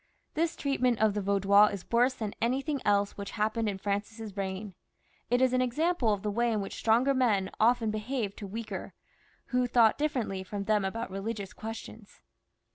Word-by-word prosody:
This 325 +1 0
treatment 255 -4 +1
of 215 -1 +3
the 210 - -1
Vaudois 200 +1 +5
is 200 -3 -6
worse 245 +2 +3
than 215 -3 -4
anything 270 +4 0
else 205 0 +2
which 200 0 -5
happened 220 +1 0
in 195 - -3
Francis's 205 +2 -4
reign. 195 0 -4 0.6
It 245 +2 +3
is 255 -1 +3
an 255 - +3
example 255 0 +1
of 205 -2 -1
the 210 - -1
way 235 +3 +1
in 215 - 0
which 195 - -5
stronger 235 +5 +3
men 220 -8 +1
often 230 -1 +3
behaved 215 -1 -3
to 205 - -6
weaker, 220 +3 -6 0.5
who 250 -1 +1
thought 235 -1 +4
differently 250 -10 -1
from 200 +2 -5
them 210 0 +2
about 195 +2 -3
religious 200 0 -4
questions. 220 -1 -9
220 Hz, 180 wpm, -29 LUFS, 200-245 Hz, 0.6 s, Vaudois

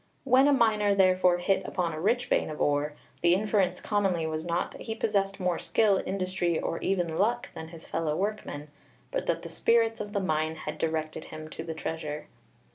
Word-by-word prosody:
'When 265 +1 +5
a - - +5
miner 215 -6 +3
therefore 185 -2 +4
hit 190 +2 +1
upon 175 -3 -2
a 155 - -5
rich 235 +6 +2
vein - - +1
of 155 - -6
ore, 145 +1 +1 0.3
the 175 +1 +5
inference 195 -3 +1
commonly 195 -6 0
was 160 0 -3
not 170 +1 -1
that - - -11
he 225 - -4
possessed 200 -3 0
more 180 -2 0
skill, 205 -4 +2
industry, 185 -3 0
or 165 - -2
even 175 -4 -1
luck 240 +4 +1
than 160 - -7
his 165 0 -12
fellow 160 -2 -1
workmen, 190 -7 -3 0.4
but - - -2
that - - 0
the - - -6
spirits 230 -1 +2
of 205 0 -6
the 200 - +1
mine 155 -3 0
had 155 -1 -6
directed 160 -1 -2
him 155 0 -8
to 160 - -6
the 160 -1 -5
treasure.' 155 -2 -4
180 Hz, 200 wpm, -28 LUFS, 160-205 Hz, 0.4 s, When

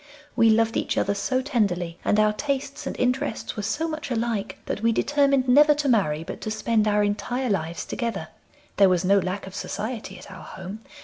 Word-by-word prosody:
We 230 -2 +5
loved 225 +1 +3
each - - -1
other 200 - +1
so 255 +6 -1
tenderly, 180 - -1
and 210 - +2
our 215 0 +4
tastes 275 +3 -3
and - - -4
interests 250 +2 -1
were 210 - -3
so 295 +11 -1
much 310 -3 -5
alike 230 -4 -2
that - - -3
we 230 +1 +3
determined 275 +1 +2
never 295 +4 +6
to 290 -1 -1
marry, 175 - +2
but - - -8
to - - -4
spend 215 0 +1
our 210 0 +3
entire 240 +4 -1
lives 170 -3 -2
together. 225 -10 -3 0.5
There 195 -1 +6
was 180 0 +1
no 200 +2 +5
lack 185 +2 -3
of 190 - -10
society 210 -1 -5
at 185 - -12
our 190 - -10
home. 190 +3 -8
215 Hz, 200 wpm, -25 LUFS, 195-255 Hz, 0.5 s, never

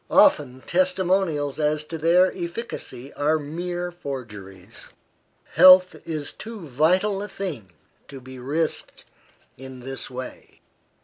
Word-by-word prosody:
Often 130 -3 +4
testimonials 180 -5 +1
as 150 0 +1
to 160 +2 -7
their 170 +4 +3
efficacy 170 - -6
are 150 +2 +1
mere 175 +4 -4
forgeries. 105 - -8 0.6
Health 185 0 +8
is 155 -3 -4
too 225 -2 -9
vital 180 +8 +1
a 205 - -4
thing 150 - -6 0.3
to 135 - -9
be 130 0 -11
risked 150 +6 -3 0.5
in 130 -1 -10
this 135 +2 -6
way. 130 0 -9
155 Hz, 115 wpm, -24 LUFS, 130-180 Hz, 0.6 s, Health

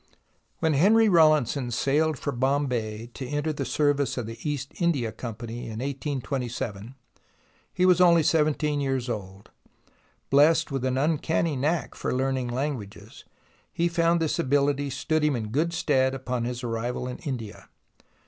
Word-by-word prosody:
When 160 -1 +2
Henry 215 +10 +5
Rawlinson 155 - +3
sailed 145 +5 +1
for 145 - -3
Bombay 125 -4 -1
to 130 - -6
enter 145 +3 -1
the 140 -2 -3
service 145 -2 +1
of 125 - -2
the 115 +1 -8
East 145 -3 -3
India 140 -10 +1
Company 115 +1 -7
in 110 -1 -6
1827, 130 -4 -4 0.8
he 180 - +1
was 180 0 +5
only 170 -2 +6
seventeen 150 -1 +1
years 135 -2 -1
old. 100 -3 -6 0.8
Blessed 155 +3 +4
with 135 -2 -2
an 130 0 0
uncanny 160 +2 0
knack 150 +4 -1
for - - -3
learning 130 -1 0
languages, 125 -4 -5 0.5
he 170 - 0
found 170 0 +2
this 160 -2 -1
ability 140 +1 +1
stood 155 +3 -1
him 150 -2 +2
in 110 -3 -4
good 155 +9 0
stead 130 -5 +1
upon 125 -2 -3
his 120 +1 -4
arrival 120 +2 -3
in 125 - -6
India. 120 -7 -6
135 Hz, 150 wpm, -26 LUFS, 120-155 Hz, 0.8 s, only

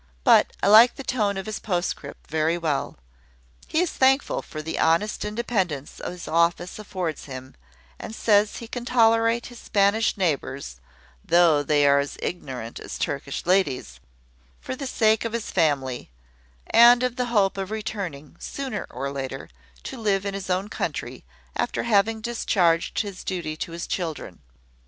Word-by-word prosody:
But - - +5
I - - +3
like 220 +4 +8
the 275 - -7
tone 215 -7 0
of 195 - -4
his 215 -1 -4
postscript 175 -7 -3
very 160 +2 +1
well. 155 -5 -2 0.7
He 320 - +1
is 360 - 0
thankful 270 +1 +2
for 155 -1 -8
the 160 +1 -4
honest 170 +7 +2
independence 210 - -2
his 180 -1 -6
office 170 +3 +1
affords 185 -6 -4
him, 130 -1 -9 0.5
and 220 - -7
says 210 -2 +3
he 230 - -8
can 245 +1 -5
tolerate 230 -1 +3
his 245 -1 -10
Spanish 205 +2 +2
neighbours 140 - -2 0.4
(though 165 -3 +4
they 145 0 +2
are 140 0 +5
as 140 0 -3
ignorant 130 -9 -5
as - - -7
Turkish 140 -1 -3
ladies), 150 - +1 0.6
for - - -5
the 275 +1 -5
sake 220 -3 +2
of 230 -1 -4
his 235 -2 -3
family, 140 - 0 0.6
and 240 +1 +7
of 250 -1 0
the 250 - -1
hope 205 -5 +2
of 195 -1 -4
returning, 190 -9 -5
sooner 265 -7 -5
or 140 0 -4
later, 135 -1 -5 0.3
to - - -7
live 200 -2 +1
in 200 - -2
his 195 -1 -6
own 185 +2 0
country, - - -4 0.3
after - - -1
having 220 0 +2
discharged 185 -8 +1
his 200 -3 -7
duty 170 -5 -3
to 165 - -5
his 170 0 -5
children. 160 - -4
190 Hz, 160 wpm, -24 LUFS, 155-225 Hz, 0.7 s, like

